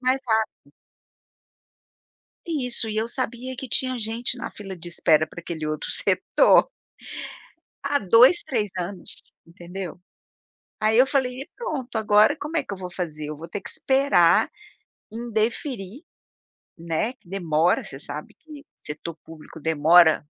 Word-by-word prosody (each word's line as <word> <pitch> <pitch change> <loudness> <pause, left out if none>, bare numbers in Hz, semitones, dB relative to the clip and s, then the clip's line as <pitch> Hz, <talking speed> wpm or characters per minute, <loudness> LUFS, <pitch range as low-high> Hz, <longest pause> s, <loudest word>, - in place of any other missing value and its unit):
mais 260 +1 +1
rápido. 220 -10 -1 1.7
Isso. 250 -8 -2
E 215 - -4
eu 225 +2 0
sabia 255 0 -3
que 265 - -7
tinha 255 +1 +2
gente 230 +3 -1
na - - -5
fila 195 -3 -8
de 175 +1 -8
espera 160 -2 +3
para 170 - -10
aquele 160 -2 -5
outro 155 0 -3
setor - - +4 1.2
há 285 0 +1
2, 230 - +6
3 225 -8 -1
anos, 180 +1 -5 0.3
entendeu? 175 +1 -8 0.8
Aí 215 +1 +2
eu 255 - +7
falei: 260 -2 0
"E, 300 - -9
pronto, 275 - -4
agora 215 +5 +4
como 305 +3 -4
é 295 - +1
que 200 - -6
eu - - -7
vou 180 -1 -6
fazer? 155 -4 -5
Eu 150 - -6
vou 165 - -9
ter 195 +4 -5
que - - -6
esperar 265 -11 +3 0.6
indeferir", 230 - -3 0.8
né, 170 +8 -1
que 210 -7 -26
demora, 170 -3 +1
você 135 - -9
sabe 145 +1 -8
que 300 -2 -13
setor 155 +2 -7
público 160 0 -12
demora 160 +1 +5
215 Hz, 145 wpm, -24 LUFS, 170-255 Hz, 1.7 s, eu